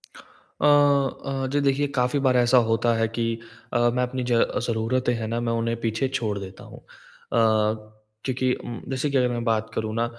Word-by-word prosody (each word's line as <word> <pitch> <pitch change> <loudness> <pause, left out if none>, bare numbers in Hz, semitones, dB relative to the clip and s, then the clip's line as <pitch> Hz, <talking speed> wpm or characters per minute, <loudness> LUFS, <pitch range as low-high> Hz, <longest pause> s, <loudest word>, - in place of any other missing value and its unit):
अ - - -8
अ, 140 -2 +2
जी 145 - +1
देखिए 140 +1 +1
काफ़ी 125 +3 +1
बार 130 -2 +3
ऐसा 120 +1 +4
होता 115 +1 +2
है 115 0 +1
कि 115 +1 -2 0.5
अ, - - +2 0.2
मैं 125 0 +1
अपनी 125 0 -3
ज - - +4 0.3
ज़रूरतें 120 +2 0
हैं 110 -1 -4
ना, 115 +1 -2
मैं 115 -1 -1
उन्हें 115 0 -1
पीछे 115 +3 0
छोड़ 110 -6 -2
देता 95 -1 -9
हूँ। - - -12
अ, - - -29 1.4
क्योंकि 130 -1 0
उम, 120 - -7
जैसे 135 +2 -1
कि 140 - +1
अगर 125 -1 +2
मैं 120 -1 -3
बात 110 -1 0
करूँ 110 -1 -2
ना 115 +1 +1
125 Hz, 195 wpm, -24 LUFS, 115-135 Hz, 1.4 s, ऐसा